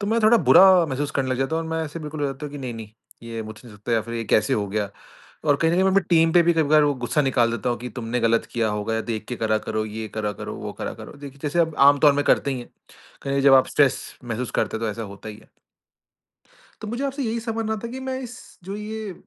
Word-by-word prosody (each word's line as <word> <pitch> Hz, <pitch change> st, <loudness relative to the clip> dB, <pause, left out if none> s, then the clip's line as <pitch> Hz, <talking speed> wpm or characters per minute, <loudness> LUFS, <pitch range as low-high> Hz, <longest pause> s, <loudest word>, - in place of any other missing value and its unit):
तो 200 Hz, -, -3 dB
मैं 230 Hz, +1 st, +2 dB
थोड़ा 220 Hz, +2 st, +6 dB
बुरा 190 Hz, -, +9 dB, 0.2 s
महसूस 140 Hz, +2 st, -2 dB
करने 130 Hz, -1 st, 0 dB
लग 130 Hz, -, -1 dB
जाता 135 Hz, +5 st, 0 dB
हूँ 165 Hz, -, -1 dB
और -, -, -7 dB
मैं 160 Hz, 0 st, -1 dB
ऐसे 155 Hz, +2 st, -7 dB
बिल्कुल 150 Hz, 0 st, -6 dB
हो 145 Hz, -, +1 dB
जाता 135 Hz, +2 st, -5 dB
हूँ 145 Hz, -, -10 dB
कि 145 Hz, -, -7 dB
नहीं-नहीं 115 Hz, -5 st, -6 dB, 0.3 s
ये 115 Hz, -1 st, -5 dB
मुझसे 110 Hz, +3 st, -11 dB
नहीं 105 Hz, -, -13 dB
सकता 105 Hz, +3 st, -4 dB
या 115 Hz, -, +3 dB
फिर 115 Hz, 0 st, -7 dB
ये 115 Hz, -1 st, -3 dB
कैसे 110 Hz, 0 st, +2 dB
हो 105 Hz, -1 st, -1 dB
गया 105 Hz, 0 st, -2 dB, 0.6 s
और 145 Hz, -1 st, +4 dB
कहीं 165 Hz, 0 st, +2 dB
न -, -, +1 dB
कहीं 185 Hz, -, +3 dB
मैं 190 Hz, -, +3 dB
अपनी 195 Hz, +1 st, +4 dB
टीम 165 Hz, -1 st, +4 dB
पे 175 Hz, -, +7 dB
भी 170 Hz, 0 st, +3 dB
कभी-कभार 155 Hz, -1 st, +4 dB
वो 145 Hz, -1 st, +2 dB
गुस्सा 150 Hz, -, +1 dB
निकाल 120 Hz, -4 st, +2 dB
देता 115 Hz, +1 st, -2 dB
हूँ, 120 Hz, -, -1 dB
कि 125 Hz, -, -6 dB
तुमने 120 Hz, +1 st, -3 dB
गलत 115 Hz, 0 st, +2 dB
किया 115 Hz, -2 st, 0 dB
होगा 105 Hz, +1 st, -2 dB
या 110 Hz, -, -1 dB
देख 110 Hz, -2 st, -4 dB
के 125 Hz, -, -3 dB
करा 110 Hz, -1 st, +1 dB
करो, 110 Hz, 0 st, -3 dB
ये 110 Hz, +1 st, -6 dB
करा 105 Hz, -1 st, -1 dB
करो, -, -, -5 dB
वो -, -, -6 dB
करा -, -, -5 dB
करो। -, -, -10 dB
देखिए 140 Hz, -1 st, -10 dB
जैसे 150 Hz, +4 st, 0 dB
अब 160 Hz, -2 st, +1 dB
आम 145 Hz, -1 st, +2 dB
तौर 145 Hz, -1 st, +6 dB
में 145 Hz, 0 st, 0 dB
करते 140 Hz, -, +2 dB
ही 130 Hz, -, -3 dB
हैं। 120 Hz, -, -10 dB, 0.5 s
कहीं 140 Hz, -, -3 dB
न -, -, 0 dB
कहीं 140 Hz, -, +1 dB
जब 135 Hz, -, +8 dB
आप 130 Hz, -, +5 dB
स्ट्रेस 140 Hz, -3 st, +3 dB, 0.2 s
महसूस 120 Hz, +1 st, -4 dB
करते -, -, -2 dB
हैं 115 Hz, -, -4 dB
तो 110 Hz, -, 0 dB
ऐसा 115 Hz, +2 st, -6 dB
होता 100 Hz, -, -10 dB
ही 105 Hz, -, -10 dB
है। -, -, -20 dB, 1.3 s
तो 215 Hz, -, -6 dB
मुझे 240 Hz, +5 st, -3 dB
आपसे 275 Hz, 0 st, -3 dB
यही 230 Hz, 0 st, -1 dB
समझना 225 Hz, -1 st, -2 dB
था -, -, -3 dB
कि 260 Hz, -, -6 dB
मैं 260 Hz, 0 st, -4 dB
इस 250 Hz, 0 st, -8 dB, 0.3 s
जो 195 Hz, +2 st, -6 dB
ये 210 Hz, -1 st, -6 dB
140 Hz, 290 wpm, -23 LUFS, 115-170 Hz, 1.3 s, बुरा